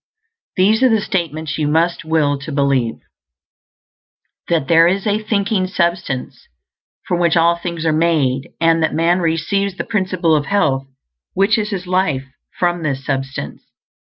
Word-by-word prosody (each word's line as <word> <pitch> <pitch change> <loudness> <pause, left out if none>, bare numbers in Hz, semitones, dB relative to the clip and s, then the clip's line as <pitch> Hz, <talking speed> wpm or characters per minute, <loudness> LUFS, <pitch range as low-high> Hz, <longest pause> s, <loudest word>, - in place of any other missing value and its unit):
These 210 +5 +3
are 260 - +5
the 220 -2 +3
statements 160 -6 -3
you 150 - 0
must 165 +3 +1
will 160 -3 +1
to 140 +3 -7
believe: 140 -5 +1 1.5
_That 160 -5 +1
there 165 +2 +5
is 190 +2 0
a 210 0 0
Thinking 200 -3 0
Substance 170 -7 -2 0.6
from 175 - 0
which 170 -1 +2
all 170 +1 +4
things 170 -1 -5
are 160 - +3
made, 150 -5 +1
and 165 0 +3
that 160 - 0
man 170 +3 +2
receives 185 +4 -1
the - - -2
Principle 185 -6 0
of 145 -1 -1
Health, 135 -10 +1 0.5
which 195 +3 +3
is 210 -1 -2
his 190 -4 -4
life, 180 -7 0 0.3
from 175 -1 0
this 135 -4 -3
Substance. 135 - -4
170 Hz, 155 wpm, -18 LUFS, 150-185 Hz, 1.5 s, are